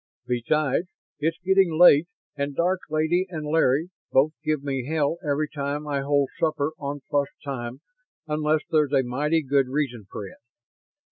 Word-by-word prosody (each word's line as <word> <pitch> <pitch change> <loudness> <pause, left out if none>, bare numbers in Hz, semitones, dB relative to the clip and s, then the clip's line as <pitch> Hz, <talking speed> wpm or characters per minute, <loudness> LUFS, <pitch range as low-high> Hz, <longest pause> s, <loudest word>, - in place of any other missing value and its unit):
Besides, 135 +6 0 0.3
it's 160 +2 0
getting 190 -4 +3
late 170 -2 +7 0.3
and 140 0 -3
Dark 180 +4 +1
Lady 160 +4 +1
and 155 -4 -5
Larry 155 +2 +2 0.2
both 140 +4 +4
give 155 -3 -1
me 135 -3 -3
hell 160 +1 0
every 150 0 0
time 145 0 -4
I 140 -1 -1
hold 140 0 +1
supper 155 -3 0
on 145 0 -4
plus 145 -1 +1 0.2
time 125 -2 -5 0.4
unless 155 0 +1
there's 150 -3 +2
a 135 -1 +4
mighty 150 +6 0
good 135 -1 +2
reason 130 -6 -2
for 100 - -6
it. 95 - -12
150 Hz, 155 wpm, -25 LUFS, 140-155 Hz, 0.4 s, late